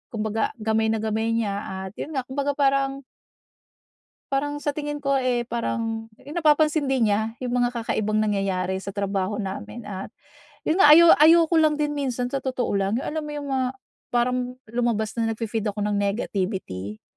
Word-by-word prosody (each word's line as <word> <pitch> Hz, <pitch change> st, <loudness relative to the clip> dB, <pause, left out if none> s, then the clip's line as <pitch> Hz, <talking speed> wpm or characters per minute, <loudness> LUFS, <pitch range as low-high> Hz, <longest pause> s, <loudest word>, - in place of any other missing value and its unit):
kumbaga 220 Hz, 0 st, -1 dB
gamay 220 Hz, 0 st, +1 dB
na 220 Hz, 0 st, 0 dB
gamay 220 Hz, +1 st, 0 dB
niya 210 Hz, -3 st, 0 dB, 0.3 s
at -, -, -9 dB
yun 315 Hz, -, -5 dB
nga 265 Hz, -, 0 dB
kumbaga 280 Hz, +2 st, -1 dB
parang 275 Hz, -1 st, +1 dB, 1.3 s
parang 290 Hz, +2 st, -1 dB
sa 290 Hz, -1 st, -2 dB
tingin 295 Hz, -1 st, -3 dB
ko, 275 Hz, -1 st, +1 dB
eh, 250 Hz, -3 st, 0 dB
parang 225 Hz, -1 st, -3 dB
napapansin 305 Hz, 0 st, +2 dB
din 260 Hz, -4 st, +2 dB
niya 220 Hz, +2 st, +1 dB
'yong 250 Hz, -1 st, -3 dB
mga 245 Hz, -, +2 dB
kakaibang 215 Hz, -1 st, 0 dB
nangyayari 195 Hz, -3 st, 0 dB
sa 195 Hz, +1 st, -6 dB
trabaho 200 Hz, 0 st, -2 dB
namin. 205 Hz, +3 st, -6 dB
At 195 Hz, +2 st, -6 dB, 0.5 s
'yon 320 Hz, -, 0 dB
nga 300 Hz, -6 st, +9 dB
ayo 340 Hz, +1 st, +8 dB
ayoko 325 Hz, +2 st, +6 dB
lang 310 Hz, -1 st, +4 dB
din 295 Hz, 0 st, -1 dB
minsan 250 Hz, -3 st, -2 dB
sa 275 Hz, -, -1 dB
totoo 255 Hz, -2 st, -2 dB
lang, 195 Hz, +1 st, 0 dB
'yong -, -, -5 dB
alam 315 Hz, 0 st, -3 dB
mo -, -, -6 dB
yung 290 Hz, -1 st, -5 dB
mga 260 Hz, -1 st, +1 dB, 0.5 s
parang 245 Hz, +1 st, +2 dB, 0.3 s
lumabas 235 Hz, -3 st, 0 dB
na 230 Hz, -, +1 dB
nagfi-feed 225 Hz, -1 st, -3 dB
ako 210 Hz, -, -3 dB
ng 210 Hz, 0 st, 0 dB
negativity 190 Hz, -, -3 dB
240 Hz, 170 wpm, -24 LUFS, 215-285 Hz, 1.3 s, nga